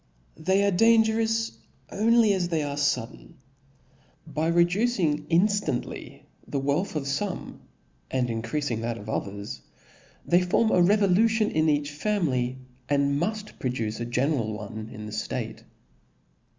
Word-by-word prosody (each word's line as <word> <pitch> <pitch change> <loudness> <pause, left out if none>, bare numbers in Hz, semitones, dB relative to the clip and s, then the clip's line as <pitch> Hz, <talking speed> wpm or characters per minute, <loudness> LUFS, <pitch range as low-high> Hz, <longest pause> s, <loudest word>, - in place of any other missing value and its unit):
They 190 +5 +2
$re 200 - +3
dangerous, 225 +2 +3 0.3
pnly 225 0 +4
as 180 -2 -1
they 160 -3 0
are 145 -1 -3
fubitaneou?. 140 -5 -2 0.9
By 155 0 -2
reducing 170 -3 +2
inftant 200 +5 +2
Jy - - -10 0.2
the 145 - -3
wealth 145 +7 -1
of 150 - -1
fome, 160 +8 -3 0.5
and 125 -1 0
increafing 115 +2 -2
that 115 0 -2
of 105 - -10
others, 100 0 -4 0.6
they 175 +1 +4
form 200 +5 +2
a 180 - +4
revolution 210 +3 +3
ii) 155 0 +3
each 145 0 0
family, 145 -8 -1 0.3
?n4 140 -1 +2
muft 210 +7 -3
produce 115 -4 -2
a 120 - -2
general 120 -2 0
one 110 +1 -7
in 105 0 -8
the 105 - -7
ftate. 110 +1 -4
155 Hz, 135 wpm, -26 LUFS, 125-200 Hz, 0.9 s, pnly